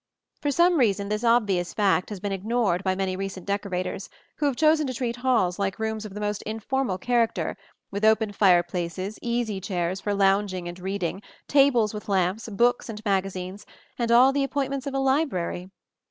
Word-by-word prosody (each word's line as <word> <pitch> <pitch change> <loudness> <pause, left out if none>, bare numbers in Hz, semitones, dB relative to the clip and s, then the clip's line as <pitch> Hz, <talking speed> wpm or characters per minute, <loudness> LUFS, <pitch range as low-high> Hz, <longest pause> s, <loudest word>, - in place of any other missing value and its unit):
For 290 - 0
some 345 +3 +3
reason 200 -4 +1
this 210 +2 -2
obvious 205 -7 +2
fact 195 -3 +2
has 205 -3 -6
been 200 +1 -3
ignored 195 -2 0
by 190 -1 +1
many 190 -1 -1
recent 195 -1 -5
decorators, 200 -1 -3 0.3
who 295 - +1
have 275 - 0
chosen 310 +1 +3
to 255 - -4
treat 240 -1 -2
halls 235 -8 +1
like 195 -1 -1
rooms 220 -1 -3
of 205 -2 -9
the - - -5
most 210 -1 -2
informal 225 -1 -2
character, 235 +3 0 0.4
with 200 +1 -4
open 220 -1 +3
fireplaces, 180 0 +1
easy 235 -4 -2
chairs 185 -1 -2
for 205 -1 -1
lounging 195 -2 +1
and 175 +1 -7
reading, 190 0 -3 0.3
tables 265 -7 +4
with 210 0 -7
lamps, 190 +3 0
books 240 +4 +1
and 215 0 -7
magazines, 195 0 -2 0.4
and 235 -1 0
all 255 +3 +6
the 280 0 +1
appointments 275 0 -2
of 275 - -3
a - - +1
library. 265 - 0
210 Hz, 180 wpm, -25 LUFS, 190-240 Hz, 0.4 s, all